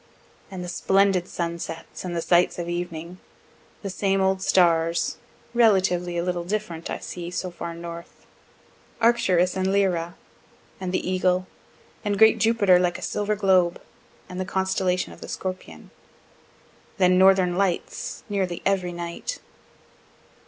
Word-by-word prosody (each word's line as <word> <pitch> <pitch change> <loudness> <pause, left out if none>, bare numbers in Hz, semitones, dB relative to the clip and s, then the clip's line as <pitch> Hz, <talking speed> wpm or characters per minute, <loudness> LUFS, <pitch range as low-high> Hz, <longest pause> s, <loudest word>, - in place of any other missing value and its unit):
And 185 -2 -6
the - - -6
splendid 190 0 +2
sunsets, 170 -1 -5
and 175 -2 -4
the 165 - -1
sights 175 0 +3
of 175 -1 -4
evening 175 0 -5 0.6
the 200 - -3
same 195 +1 0
old 190 0 +1
stars, 170 -3 +2 0.4
(relatively 185 -6 +3
a 170 - 0
little 175 -1 -2
different, 180 -3 -4
I - - -2
see, 175 -1 -7
so 180 0 -4
far 170 -1 -6
north) 170 0 -9 0.7
Arcturus 190 -7 +3
and 190 0 0
Lyra, 180 -4 +1 0.6
and 185 -1 -3
the 185 - -1
Eagle, 185 0 +1 0.6
and 205 -2 -1
great 220 +1 +6
Jupiter 205 -5 +4
like 175 -1 0
a - - -9
silver 210 0 -1
globe, 185 -4 +3 0.5
and 180 - -7
the - - 0
constellation 190 -1 -1
of - - -16
the - - -8
Scorpion. 185 -1 -6 1.1
Then 185 -1 +4
northern 190 -2 +5
lights 190 -2 -2
nearly 190 -5 -2
every 185 -2 +1
night. 170 - -5
185 Hz, 140 wpm, -24 LUFS, 175-195 Hz, 1.1 s, great